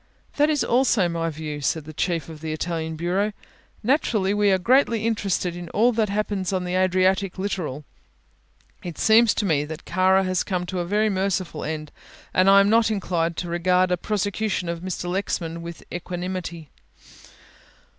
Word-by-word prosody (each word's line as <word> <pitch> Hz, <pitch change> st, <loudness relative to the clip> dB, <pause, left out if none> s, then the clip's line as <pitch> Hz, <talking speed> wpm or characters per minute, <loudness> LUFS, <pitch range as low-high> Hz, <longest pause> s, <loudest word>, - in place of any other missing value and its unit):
"That 295 Hz, +1 st, +4 dB
is 295 Hz, -3 st, +1 dB
also 235 Hz, -6 st, +3 dB
my 165 Hz, -1 st, -2 dB
view," 150 Hz, -1 st, -6 dB
said 155 Hz, +3 st, 0 dB
the 155 Hz, -, -9 dB
Chief 165 Hz, -1 st, -1 dB
of 160 Hz, -2 st, -10 dB
the 160 Hz, -1 st, -4 dB
Italian 160 Hz, 0 st, -3 dB
bureau; 185 Hz, +6 st, 0 dB, 0.5 s
"naturally 215 Hz, -6 st, +1 dB
we 205 Hz, 0 st, +3 dB
are 190 Hz, -, +4 dB
greatly 230 Hz, +2 st, +2 dB
interested 195 Hz, -5 st, -1 dB
in 175 Hz, -1 st, -7 dB
all 235 Hz, +4 st, +4 dB
that 220 Hz, -3 st, 0 dB
happens 200 Hz, -2 st, -1 dB
on 185 Hz, -1 st, -1 dB
the 180 Hz, 0 st, -3 dB
Adriatic 185 Hz, +1 st, +2 dB
littoral. 170 Hz, -7 st, -3 dB, 1.0 s
It 175 Hz, -3 st, -6 dB
seems 225 Hz, 0 st, +5 dB
to 210 Hz, -, 0 dB
me 155 Hz, -6 st, +2 dB
that 155 Hz, +1 st, -8 dB
Kara 185 Hz, +2 st, +3 dB
has 185 Hz, -1 st, 0 dB
come 180 Hz, -3 st, -2 dB
to 185 Hz, 0 st, -4 dB
a 175 Hz, -, -1 dB
very 210 Hz, +4 st, +1 dB
merciful 185 Hz, -4 st, -1 dB
end 155 Hz, -1 st, -4 dB, 0.4 s
and 185 Hz, +1 st, +4 dB
I 200 Hz, 0 st, +8 dB
am 200 Hz, -, +3 dB
not 225 Hz, 0 st, +4 dB
inclined 170 Hz, -5 st, -1 dB
to 175 Hz, -, -3 dB
regard 180 Hz, +2 st, +2 dB
a -, -, +4 dB
prosecution 205 Hz, -1 st, -2 dB
of 170 Hz, 0 st, -3 dB
Mr. 180 Hz, 0 st, -4 dB
Lexman 175 Hz, -3 st, -2 dB
with 170 Hz, 0 st, -8 dB
equanimity." 175 Hz, -2 st, -5 dB
185 Hz, 175 wpm, -24 LUFS, 170-205 Hz, 1.0 s, I